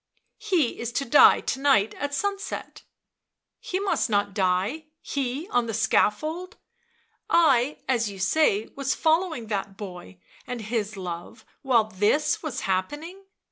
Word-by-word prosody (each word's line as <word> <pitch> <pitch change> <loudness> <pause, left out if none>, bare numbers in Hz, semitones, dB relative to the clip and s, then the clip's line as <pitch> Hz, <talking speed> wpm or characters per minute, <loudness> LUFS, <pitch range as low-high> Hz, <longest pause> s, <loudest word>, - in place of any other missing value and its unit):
" - - -53
He 320 -10 +2
is 235 0 -3
to 275 - -1
die 285 +4 +6
to - - -3
night 270 -7 +3
at 285 +1 -4
sunset." 400 +3 -4 0.4
" - - -60 0.3
He 370 - -3
must 395 -10 0
not 205 -1 +1
die— 195 +10 0
he, 275 +4 -3
on 245 - +1
the 225 - -3
scaffold! 310 - 0 0.7
I, 285 -5 +3
as 235 -4 +1
you 200 - -9
say, 205 +2 +2
1 - - -21
was 275 -1 -1
following 320 -6 +1
that 200 -2 -4
boy 180 - -9 0.3
and 245 -1 -4
his 215 -1 -3
love 175 +3 -7 0.2
while 250 -5 +3
this 215 +9 +1
was 305 -6 -4
happening 295 - -3
245 Hz, 150 wpm, -25 LUFS, 205-305 Hz, 0.7 s, die